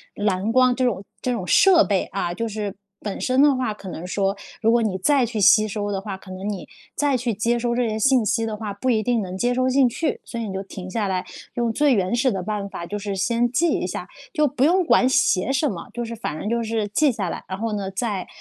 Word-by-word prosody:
蓝 205 +1 0
光 255 0 +4
这 255 +1 +1
种 200 -6 -1 0.2
这 250 - -1
种 230 -7 -2
设 355 - +6
备 195 -3 0
啊， 175 - -3
就 230 +6 -3
是 210 -2 -4 0.2
本 205 -2 -5
身 255 +1 +2
的 290 -1 +5
话 255 -4 -1
可 200 -2 -10
能 175 0 -6
说 195 +2 -1 0.2
如 225 - +4
果 235 0 +3
你 210 -4 -1
再 275 +4 +3
去 225 -2 -4
吸 215 +2 +6
收 205 0 -3
的 195 - -1
话， 195 -1 -5
可 190 - -15
能 185 +2 -6
你 200 -4 -4 0.3
再 290 -2 +1
去 240 -1 -1
接 230 +4 +1
收 235 0 -1
这 245 -1 +1
些 215 - -2
信 255 +2 +3
息 225 +2 +1
的 220 -1 -3
话， 210 -1 -5
不 200 +6 -2
一 220 -2 +2
定 240 0 +1
能 185 -2 -5
接 245 +4 +1
收 255 0 +2
进 260 0 +4
去。 315 +7 -2
所 235 - -6
以 - - -2
你 195 - -5
就 190 - -3
停 190 -1 -8
下 210 +1 -1
来， 185 -1 -1 0.3
用 235 -1 0
最 290 +2 +3
原 190 +2 +1
始 255 +2 +2
的 190 - -2
办 205 0 -3
法 170 - -6
就 205 +4 -4
是 200 -1 -4
先 235 +5 +1
记 330 +7 +2
一 - - 0
下， - - -5 0.3
就 300 -1 +3
不 265 -1 -1
用 360 +5 +4
管 255 - +4
写 205 -3 +2
什 275 +2 +1
么， 175 -7 -7
就 240 0 -3
是 230 0 -6
反 165 -9 -4
正 - - -5
就 235 0 0
是 220 -2 -1
记 280 +8 +2
下 200 -6 -3
来， - - -5
然 190 - -4
后 225 +1 -2
呢， 200 -2 -3
再 195 -2 -3
220 Hz, 285 characters per minute, -23 LUFS, 195-250 Hz, 0.3 s, 设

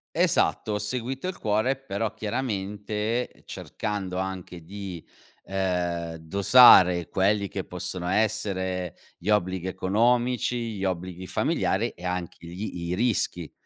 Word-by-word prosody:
Esatto, 105 - +2
ho 105 - -1
seguito 130 - -3
il 185 - -4
cuore, 110 +5 +1
però 115 -5 -3
chiaramente, 105 +1 -3
cercando 95 -3 -4
anche 95 -2 -5
di, 95 -2 -7 0.4
ehm, 90 -3 -2
dosare 90 -1 +7
quelli 100 +1 +2
che 95 - -4
possono 90 0 -5
essere 95 -4 -1 0.2
gli 95 - -5
obblighi 95 -3 +1
economici, 120 +4 +1
gli 95 - -2
obblighi 90 0 -4
familiari, - - 0
e 90 - -15
anche 90 -1 -3
gli 85 -1 -5
i 90 - 0
rischi, 95 -7 0
95 Hz, 120 wpm, -26 LUFS, 90-110 Hz, 0.4 s, dosare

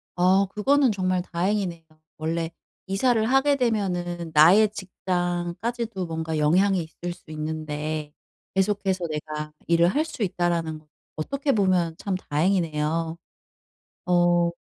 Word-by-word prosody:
어 185 +2 +4
그거는 265 +7 +2
정말 185 -2 0
다행이네요. 180 -1 -2 0.3
원래 165 +1 -2 0.4
이사를 220 +4 +2
하게 270 +4 +3
되면은 180 -8 -1
나의 185 +8 +7
직장까지도 185 +3 -3
뭔가 160 -1 -3
영향이 180 +4 +3
있을 175 +2 -6
수 155 - -16
있는데 155 -1 -4 0.4
'계속해서 190 -2 0
내가 150 0 -5
일을 170 0 +4
할 295 - +2
수 305 -8 -5
있다.'라는 170 -4 -1 0.3
어떻게 275 - -1
보면 185 -5 +2
참 195 -1 -2
다행이네요. 165 -1 0 0.9
어. 175 -1 +3
175 Hz, 265 characters per minute, -25 LUFS, 160-200 Hz, 0.9 s, 나의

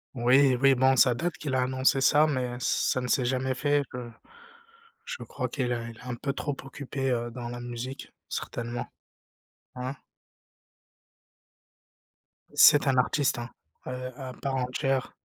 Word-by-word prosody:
Oui, 130 +2 +5
oui 135 +1 +6
bon, 130 +1 +4
ça 125 +1 +5
date 165 +6 -3
qu'il 140 -3 -4
a 130 - +2
annoncé 130 +1 +2
ça, 145 +3 +5
mais 125 -5 -1
ça 130 - +1
ne 125 - -3
s'est 125 0 +2
jamais 130 +1 0
fait, 145 +2 +1
heu, 125 -1 -6 0.9
je 485 0 -6
crois - - -4
qu'il 125 -3 -2
est 115 -1 -3
il 115 - -13
est - - -14
un 125 - -2
peu 140 +4 -3
trop 145 0 -3
occupé, 135 -1 -4
heu, 120 -1 -1
dans 120 0 -6
la 120 0 -6
musique, 120 +2 -6 0.2
certainement. 120 0 -4 0.9
Hein? 130 +2 -4 2.6
C'est 145 -1 +7
un 130 - +3
artiste, 130 0 +2
hein, 120 +1 -6 0.4
heu, 125 0 -5
à 130 -2 -7
part 135 +2 -3
entière. 130 +1 -1
130 Hz, 155 wpm, -28 LUFS, 120-135 Hz, 2.6 s, C'est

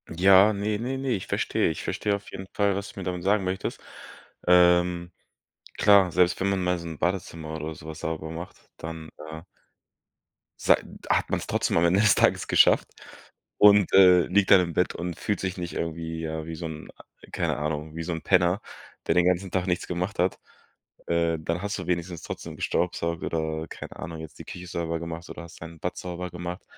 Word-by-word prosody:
Ja, 95 +4 +6
ne, 105 0 -2
ne, 130 +3 -3
ne, 135 0 -3
ich 100 -6 -2
verstehe - - 0
ich 80 - -4
verstehe 105 -1 -1
auf 100 0 -9
jeden 95 - -7
Fall, 100 -1 +2
was 100 0 -5
du - - -9
mir - - -5
damit 90 -1 -4
sagen 100 +1 +2
möchtest. 95 +1 -3 0.7
Ähm, 90 0 +4 0.7
klar, 100 -3 +5
selbst 90 0 +2
wenn 100 - +2
man 95 -2 0
mal 90 0 0
so 85 - -8
'n 80 -2 -7
Badezimmer 85 -2 -3
oder 80 0 -5
so 75 - -13
was 80 0 -7
sauber 80 -1 -4
macht, 85 +2 -8 0.2
dann, 80 -1 -7 0.2
äh 80 0 -8 1.2
sei - - +5 0.3
hat - - +2
man's - - -2
trotzdem - - 0
am 85 - +4
Ende 90 +4 +4
des 105 -5 +5
Tages - - +2
geschafft - - +4 0.7
und, 105 -2 +6
äh, 90 -2 +8
liegt 100 +2 +2
dann 95 -2 +9
im 85 -2 -3
Bett 90 - 0
und 85 -1 -4
fühlt 105 - -1
sich 95 0 -3
nicht 85 -1 -5
irgendwie, 80 0 -4
ja, 80 -1 -4
wie 80 0 -6
so 85 +1 -6
'n 80 -1 -7
ah, - - -15 0.3
keine - - -1
Ahnung, 75 +1 -3
wie 85 - -4
so 85 +1 -3
'n 80 - -5
Penner, 90 0 +3 0.5
der - - +2
den 90 0 +4
ganzen 90 +1 +1
Tag 95 0 -1
nichts 90 0 -1
gemacht 90 +2 -3
hat. 90 +1 +1 0.7
Äh, 85 -1 +1
dann 85 +2 -2
hast 100 +1 -3
du 90 - -6
wenigstens 85 -1 -2
trotzdem - - -7
gestaubsaugt 85 0 -1
oder, 80 0 -2
keine - - -9
Ahnung, 80 -1 -7
jetzt 80 - -10
die - - -9
Küche 90 0 -8
sauber 85 -1 -3
gemacht 85 0 -7
oder - - -8
hast 85 - -13
dein 80 0 -9
Bad - - -4
sauber 90 0 -5
gemacht. 90 +1 -6
90 Hz, 205 wpm, -26 LUFS, 80-95 Hz, 1.2 s, dann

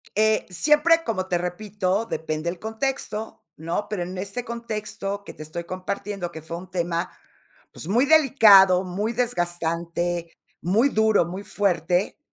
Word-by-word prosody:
Eh, 215 +1 +3
siempre, 300 - +4
como 190 -7 -2
te 180 -2 +1
repito, 190 +3 -2
depende 160 -4 -3
el 175 0 -6
contexto, 220 -1 -4
¿no?, 165 +6 -3
pero, 195 -4 -2
en 180 +2 -7
este 200 +6 -4
contexto 210 -3 -5
que - - -10
te 155 - -9
estoy 165 +3 -6
compartiendo, 185 0 -4
que 160 - -8
fue 165 +2 -6
un 185 +1 -10
tema, 170 0 -1 0.6
pues, - - -8
muy 240 +8 +3
delicado, 210 -11 +6
muy 205 +5 -2
desgastante, 175 -6 -2 0.3
muy 215 +10 +3
duro, 220 -7 +3
muy 185 +4 -6
fuerte, 180 - 0
190 Hz, 145 wpm, -24 LUFS, 175-220 Hz, 0.6 s, delicado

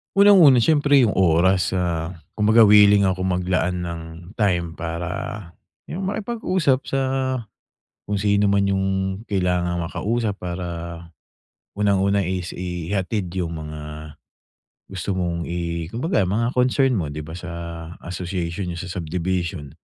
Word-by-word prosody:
Unang-una 180 - +7
siyempre 145 -3 +4
'yung 110 - +3
oras 95 +1 +3
sa 85 -3 -1 0.3
kumbaga 110 +2 +6
willing 105 -1 +7
akong 95 -1 +1
maglaan 90 0 -1
ng 85 -1 -5 0.4
time 90 -5 +1
para 85 +3 -5 0.4
'yung 190 +2 -3
makipag-usap 190 - 0
sa 135 - 0 1.0
kung 105 0 -2
sino 100 0 +2
man 100 0 +2
'yung 95 -1 +1 0.4
kailangang 90 -2 0
maka-usap 110 +3 -1
para, 90 0 -4 1.1
unang-una 100 -1 +2
is 90 -1 -3
ihatid 90 +2 -3
'yung 85 -2 -2
mga 75 -1 -8 0.7
gusto 95 +1 -3
mong 85 -2 -2
i 85 -1 -3
kumbaga 125 - +1
mga 110 +6 0
concern 130 0 +2
mo 85 - -1
'di 75 - -5
ba 80 +3 -8
sa 90 -1 -7 0.6
association 90 0 -3
niyo 85 - -5
sa 95 - -7
subdivision. 85 -2 -3
95 Hz, 125 wpm, -22 LUFS, 85-105 Hz, 1.1 s, Unang-una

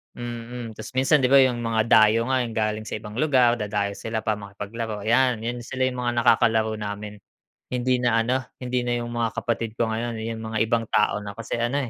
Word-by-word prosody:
Mm. 120 -1 -6
Tas 110 - -8
minsan 135 +3 +4
'di 130 - +3
ba, 140 - +4
'yung 125 -2 +2
mga 115 -1 +1
dayo 110 +2 +5
nga, 130 -1 +2
'yung 115 -2 -7
galing 110 -1 -1
sa - - -4
ibang 105 0 -8
lugar, 125 -6 +3
dadayo 105 -1 -1
sila 110 -1 -4
para 110 -1 0
makipaglaro 105 +1 -6
'yan. 120 0 +2
'Yun 120 +1 -3
sila 130 0 -2
'yung 125 -1 -6
mga 120 -1 0
nakakalaro 110 -2 +3
namin. 105 0 -6 0.5
Hindi 125 0 +1
na 115 -2 +2
ano, 125 +3 +1 0.2
hindi 125 0 -1
na 120 0 0
'yung 120 0 -5
mga 120 -1 0
kapatid 115 -1 -2
ko 115 -1 0
ngayon. 115 +1 -2
'Yung 115 0 -4
mga 110 0 -4
ibang 115 0 0
tao 105 -1 +2
na 100 -1 -8
kasi 115 +1 -4
ano, 125 +2 0
115 Hz, 210 wpm, -24 LUFS, 110-120 Hz, 0.5 s, dayo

